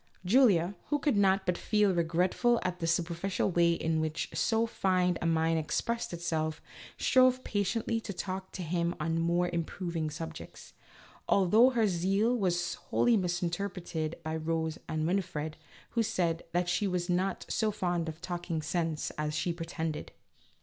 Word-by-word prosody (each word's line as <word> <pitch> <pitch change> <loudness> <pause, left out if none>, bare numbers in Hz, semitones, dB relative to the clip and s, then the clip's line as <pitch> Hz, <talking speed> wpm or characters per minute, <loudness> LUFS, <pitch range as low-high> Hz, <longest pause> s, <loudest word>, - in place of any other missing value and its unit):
Julia, 195 -5 +4
who 295 - +1
could 290 -3 +1
not 195 -1 +3
but 180 -1 0
feel 210 -3 +2
regretful 180 +8 +2
at 180 -1 -2
the 165 - -2
su 170 +1 +2
perficial 175 +3 -2
way 170 0 +4
in 160 -1 0
which 155 0 -2
so 225 0 +2
fine 185 -5 +1
a 165 - 0
mind 165 0 +2
expressed 230 +9 -2
itself, 160 -2 -2 0.4
strove 255 0 +4
patiently 225 +3 -1
to 225 - -5
talk 190 0 -5
to 185 - -5
him 170 +1 -1
on 165 +1 0
more 170 +1 +2
improving 170 -1 -2
subjects, 160 +2 -8 0.6
although 210 +6 +5
her 235 -4 +2
zeal 195 +6 +1
was 175 -5 0 0.2
wholly 240 -1 +3
misinterpreted 175 -3 -2
by 160 0 -3
Rose 160 0 -2
and 155 0 -1
Winifred, 165 -4 -1 0.4
who 235 - +1
said 170 -6 0
that 175 +1 0
she 180 +4 +1
was 180 -2 -1
not 185 +2 0
so 220 - +1
fond 175 -5 -1
of 160 +2 -9
talking 175 -3 -3
sense 165 -3 -1
as 150 0 -1
she 170 +2 0
pretended. 165 -2 -4
175 Hz, 155 wpm, -30 LUFS, 165-195 Hz, 0.6 s, although